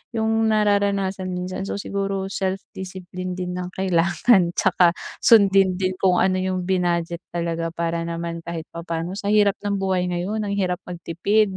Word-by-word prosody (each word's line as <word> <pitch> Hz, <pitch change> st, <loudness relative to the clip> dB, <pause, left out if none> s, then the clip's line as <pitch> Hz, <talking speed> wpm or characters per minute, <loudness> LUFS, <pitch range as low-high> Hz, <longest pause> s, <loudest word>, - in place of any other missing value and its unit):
'yung 220 Hz, 0 st, +1 dB, 0.2 s
nararanasan 200 Hz, -3 st, +1 dB
minsan. 185 Hz, +2 st, -4 dB
So -, -, -3 dB
siguro 195 Hz, -1 st, -3 dB
self 190 Hz, 0 st, -2 dB
discipline 185 Hz, -1 st, -6 dB
din 180 Hz, 0 st, -4 dB
ang 180 Hz, 0 st, -6 dB
kailangan 185 Hz, +1 st, +3 dB
tsaka 180 Hz, -2 st, +3 dB, 0.2 s
sundin 195 Hz, -4 st, +5 dB
din 185 Hz, 0 st, -2 dB
kung 185 Hz, -2 st, +3 dB
ano 185 Hz, +1 st, +2 dB
'yung 185 Hz, -1 st, -1 dB
binadget 175 Hz, -2 st, 0 dB
talaga 170 Hz, -1 st, -3 dB
para 170 Hz, 0 st, -2 dB
naman 170 Hz, 0 st, -4 dB
kahit 165 Hz, -1 st, -6 dB
papaano. 170 Hz, +3 st, -4 dB
Sa 200 Hz, -, -4 dB
hirap 205 Hz, -1 st, +3 dB
ng 205 Hz, 0 st, -1 dB
buhay 190 Hz, -2 st, 0 dB
ngayon 200 Hz, +5 st, -2 dB
ang 200 Hz, -, -1 dB
hirap 180 Hz, -2 st, 0 dB
magtipid 185 Hz, +4 st, 0 dB
185 Hz, 155 wpm, -23 LUFS, 175-195 Hz, 0.2 s, sundin